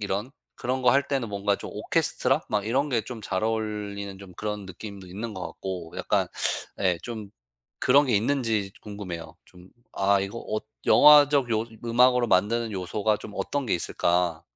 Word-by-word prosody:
이런 105 +4 -2 0.3
그런 130 +1 -2
거 125 - +6
할 140 +1 +3
때는 135 -5 -1
뭔가 100 0 0
좀 - - -8
오케스트라 135 +4 +1
막 105 -1 0
이런 135 +6 +1
게 120 - +2
좀 115 0 -8
잘 95 0 -2
어울리는 105 -3 -3
좀 100 -2 -12
그런 105 -2 -4
느낌도 95 +1 -9
있는 105 +5 -6
것 90 -2 -4
같고 90 -1 -6
약간 - - +1 0.5
예 90 -3 +2
좀 110 -4 -7 0.5
그런 140 +3 +5
게 120 - +1
있는지 110 -4 0
궁금해요. 90 -6 -7
좀 90 0 -17 0.2
'아 100 0 +2
이거 100 +4 -4
어 110 - -1 0.3
영화적 145 -3 +7
요 110 0 +1 0.2
음악으로 125 +1 +4
만드는 110 +5 +2
요소가 100 +3 0
좀 105 - -9
어떤 145 -1 -2
게 - - +1
있을까.' 85 -1 0
105 Hz, 315 characters per minute, -26 LUFS, 95-120 Hz, 0.5 s, 영화적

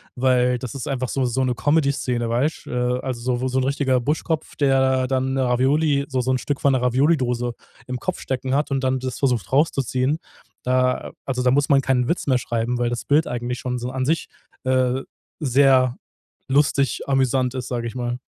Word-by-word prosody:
weil 125 -1 +2
das 130 +1 -6
ist 135 -4 -6
einfach 130 -3 -2
so 135 -2 0
so 125 +2 0
'ne 125 -1 +1
Comedy 145 +3 +2
Szene, 120 -4 -2
weißt? 130 +7 -1
Äh, 125 0 -1
also 130 -2 -4
so 120 0 -1
wo 130 - 0
so'n 130 0 0
richtiger 135 -2 +1
Buschkopf, 155 +4 -2
der 130 -2 +2
dann 130 0 0
Ravioli 140 +3 +2
so 130 -2 -1
so 130 +1 0
'n 130 - +2
Stück 140 +2 -3
von 140 - +4
'ner 130 - +1
Ravioli 135 +6 +3
Dose 120 -2 -1 0.3
im 125 0 -4
Kopf 185 +6 -3
stecken 130 0 -2
hat 145 0 0
und 135 -1 0
dann 130 0 +1
das 130 -1 -4
versucht 125 -9 0
rauszuziehen, 135 0 +1 0.5
äh, 125 0 +1
also 125 -2 -2
da 125 - +4
muss 145 +2 +2
man 140 -1 +4
keinen 125 -2 +1
Witz 170 - -1
mehr 130 -2 +3
schreiben, 120 0 -2
weil 120 -1 0
das 120 0 -3
Bild 150 +2 +2
eigentlich 120 0 -3
schon 125 +2 -3
so 120 +1 -4
an 130 0 -2
sich, 160 +4 0 0.3
äh, 130 0 +1 0.4
sehr 130 -2 +4 0.5
lustig 140 -2 +2
amüsant 130 -1 +2
ist, 130 -2 -4
sage 120 -2 -3
ich 115 - -8
mal. 120 -1 -2
130 Hz, 205 wpm, -22 LUFS, 125-135 Hz, 0.5 s, von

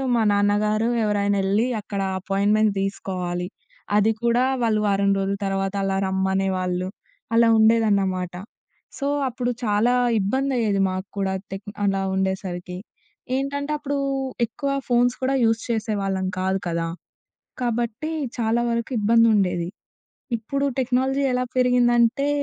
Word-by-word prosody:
మా 230 - +2
నాన్నగారు 210 +2 +2
ఎవరైనెళ్లి, 205 +1 +1
అక్కడ 200 -1 -4 0.2
అపాయింట్‌మెంట్ 205 +2 +2
తీసుకోవాలి. 180 -2 -3 0.5
అది 210 +2 +4
కూడా 235 +1 +3 0.2
వాళ్ళు 215 -2 +2
వారం 200 0 +2
రోజుల 195 +1 -1
తర్వాత 195 0 -1
అలా 195 0 0
రమ్మనేవాళ్ళు. 190 -1 0 0.5
అలా 230 0 +5
ఉండేదన్నమాట. 200 -5 +2 0.7
సో, 280 - -1 0.2
అప్పుడు 245 0 -2
చాలా 215 +3 +2 0.3
ఇబ్బందయ్యేది 230 -2 0
మాకు 185 +1 -4
కూడా 190 -1 0 0.2
తెక్ 195 +1 -7 0.2
అలా 195 -1 +1
ఉండేసరికి. 185 -2 -3 0.6
ఏంటంటే, 285 +2 -2
అప్పుడూ 285 -1 -3 0.5
ఎక్కువ 275 +5 -4 0.2
ఫోన్స్ 245 0 +3
కూడా 270 +1 +1
యూస్ 225 0 +2
చేసేవాళ్ళం 205 -4 -1
కాదు 190 +1 0
కదా! 165 -1 -1 0.8
కాబట్టి, 240 +4 -2 0.3
చాలా 230 +1 +1
వరకు 235 +2 -2
ఇబ్బందుండేది. 210 -5 +3 0.7
ఇప్పుడు 275 +6 -2
టెక్నాలజీ 265 +2 +1
ఎలా 250 0 0
పెరిగిందంటే, 245 +1 +3
210 Hz, 110 wpm, -23 LUFS, 195-240 Hz, 0.8 s, అలా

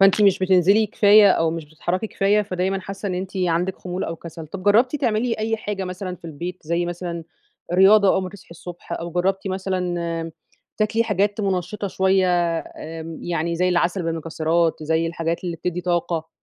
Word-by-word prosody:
فأنتِ 195 +2 +5
مش 200 -2 +5
بتنزلي 190 +3 +4
كفاية 205 -1 +6
أو 165 -2 +2
مش 165 -1 -5
بتتحركي 175 +7 -3
كفاية، 205 +1 +2
فدايمًا 190 0 -2
حاسة 195 +2 -6
إن 180 - -2
أنتِ 185 +1 -4
عندِك 180 +1 0
خمول 180 0 -4
أو 165 - -4
كسل، 165 -1 -9
طب 185 +4 -8
جربتِ 235 +8 +4
تعملي 230 -1 0
أي 225 +1 0
حاجة 205 -3 -4
مثلًا 180 0 -5
في 170 - -32
البيت، 170 +3 -5
زي 170 +2 -1
مثلًا 175 -1 -5 0.5
رياضة 195 +2 +6
أول 190 - +1
ما 185 - -4
تصحي 200 -4 -15
الصبح، 175 0 -10
أو 170 0 -4
جربتِ 190 +3 0
مثلًا 190 0 -2 0.4
امم 165 0 -5 0.5
تاكلي 220 +2 +2
حاجات 205 0 0
منشطة 195 +1 -2
شوية 190 0 +2 0.3
آمم 160 0 -8
يعني 170 0 -1
زي 180 +1 +2
العسل 175 +1 +1
بالمكسرات، 165 0 0
زي 160 +2 +1
الحاجات 165 +1 -3
اللي 170 -2 -3
بتدي 180 +2 -3
طاقة، 170 -2 -1
180 Hz, 180 wpm, -22 LUFS, 170-195 Hz, 0.5 s, كفاية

